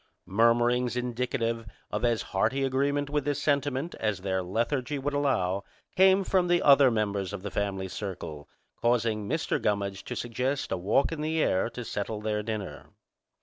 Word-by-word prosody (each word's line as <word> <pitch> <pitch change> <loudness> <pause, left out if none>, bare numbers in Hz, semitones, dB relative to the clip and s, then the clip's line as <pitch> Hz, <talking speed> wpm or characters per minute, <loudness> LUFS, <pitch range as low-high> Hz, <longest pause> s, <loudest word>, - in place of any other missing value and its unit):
Murmurings 120 +4 +3
indicative 120 -2 -2 0.2
of - - -2
as 120 -2 +2
hearty 110 +8 0
agreement 140 +2 +1
with 145 0 -1
this 145 0 -1
sentiment 145 +2 0
as 105 -3 -1
their 95 -1 -1
lethargy 120 +9 -1
would 145 +2 -2
allow 100 -10 +1 0.3
came 190 +1 +5
from 185 -1 +2
the 175 0 +3
other 140 -2 +7
members 100 -4 -1
of 100 -2 -6
the 100 - -4
family 95 -2 -2
circle, 90 -7 -6 0.3
causing 115 -3 +1
Mr. 160 +2 0
Gummidge 100 -1 -1
to - - -5
suggest 125 +4 -2
a - - +2
walk 100 - +1
in 160 -2 -4
the 160 +1 0
air 95 +4 +1
to 120 0 -7
settle 105 +1 -3
their 105 0 -1
dinner. 105 -2 -5
115 Hz, 165 wpm, -28 LUFS, 100-140 Hz, 0.3 s, other